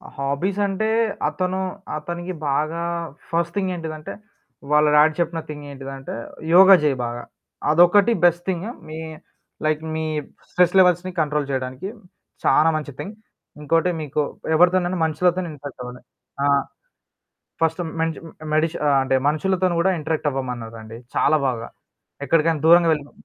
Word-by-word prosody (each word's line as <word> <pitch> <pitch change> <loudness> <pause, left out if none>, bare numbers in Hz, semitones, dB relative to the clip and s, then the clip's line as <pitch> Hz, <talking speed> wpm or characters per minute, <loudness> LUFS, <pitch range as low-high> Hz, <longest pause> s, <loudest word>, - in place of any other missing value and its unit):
హాబీసంటే 190 +9 -1 0.4
అతను 185 +1 -2 0.4
అతనికి 175 +3 -5 0.2
బాగా 155 +4 -1 0.5
ఫస్ట్ 170 0 -1
థింగేంటిదంటే, 165 -5 -3 0.6
వాళ్ళ 150 0 +5
డాడి 155 +1 +6
చెప్పిన 170 -1 0
థింగేంటిదంటే 135 -2 -8 0.4
యోగ 190 +2 +8
జేయి 145 -3 +2
బాగా. 120 0 -5 0.5
అదొకటి 175 +7 +5
బెస్ట్ 175 0 +3
థింగ్. 185 +3 -2 0.2
మీ 155 +1 -7 0.7
లైక్ 155 0 +1
మీ 160 - -2 0.5
స్ట్రెస్ 180 0 +2
లెవెల్స్‌ని 180 0 +3
కంట్రోల్ 150 -1 -1
చేయడానికి, 130 +6 -3 0.5
చానా 160 +1 +4
మంచి 145 -2 -6
థింగ్. 205 +2 -6 0.5
ఇంకోటి 165 +4 +2
మీకు 150 0 -1 0.3
ఎవరితోనైనా 180 +1 +3
మనుషులతోని 175 +3 +1
ఇంటరాక్టవ్వాలి. 125 -4 -9 0.4
ఆహ్, 140 -1 +3 1.0
ఫస్ట్ 165 +2 +1 0.2
మెంచ 165 -1 0 0.4
మెడిచి 155 +1 +1
ఆహ్, 140 - +4
అంటే 135 0 +1
మనుషులతోని 185 +3 0
కూడా 190 +2 +3
ఇంటరాక్టవ్వమన్నారండి. 125 -8 -4 0.2
చాలా 155 - +3
బాగా. 115 -3 -3 0.6
ఎక్కడికైనా 160 -1 +2
దూరంగా 170 0 +7
వెళ్ళినా 145 -2 -2
160 Hz, 115 wpm, -22 LUFS, 145-175 Hz, 1.0 s, యోగ